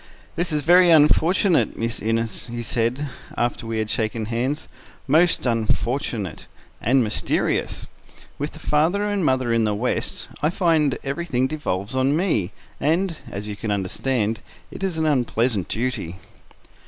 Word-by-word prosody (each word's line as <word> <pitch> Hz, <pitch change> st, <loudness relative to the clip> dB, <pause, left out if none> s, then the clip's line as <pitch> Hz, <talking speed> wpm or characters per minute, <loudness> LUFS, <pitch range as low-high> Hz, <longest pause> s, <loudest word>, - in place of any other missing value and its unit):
"This 175 Hz, 0 st, 0 dB
is 150 Hz, -1 st, 0 dB
very 175 Hz, +3 st, +6 dB
unfortunate, 165 Hz, +4 st, +4 dB
Miss 115 Hz, +1 st, -2 dB
Innes," 115 Hz, +1 st, -1 dB
he 120 Hz, 0 st, -5 dB
said, 120 Hz, +5 st, -1 dB, 0.3 s
after 120 Hz, -1 st, -1 dB
we 115 Hz, 0 st, -2 dB
had 110 Hz, -1 st, -1 dB
shaken 110 Hz, 0 st, -2 dB
hands. 125 Hz, +7 st, -2 dB, 0.4 s
"Most 165 Hz, +4 st, +3 dB
unfortunate—and 115 Hz, -, -1 dB
mysterious. 105 Hz, -1 st, -1 dB, 0.5 s
With 145 Hz, +2 st, -3 dB
the -, -, -11 dB
father 160 Hz, +7 st, +2 dB
and 205 Hz, -2 st, 0 dB
mother 130 Hz, -4 st, +2 dB
in 115 Hz, -1 st, +3 dB
the 105 Hz, -1 st, +1 dB
west, 120 Hz, +5 st, -2 dB
I 150 Hz, -, +3 dB
find 165 Hz, -6 st, +2 dB
everything 140 Hz, -3 st, -1 dB
devolves 120 Hz, -8 st, -3 dB
on 130 Hz, +3 st, +2 dB
me; 160 Hz, -, +1 dB, 0.3 s
and, 165 Hz, +3 st, +1 dB
as 100 Hz, +1 st, -6 dB
you 105 Hz, -, -4 dB
can 110 Hz, +1 st, -5 dB
understand, 105 Hz, +3 st, -1 dB, 0.3 s
it -, -, -9 dB
is 190 Hz, -4 st, -1 dB
an 160 Hz, -, +1 dB
unpleasant 120 Hz, -, +1 dB
duty." 115 Hz, -7 st, -2 dB
130 Hz, 140 wpm, -23 LUFS, 115-155 Hz, 0.5 s, very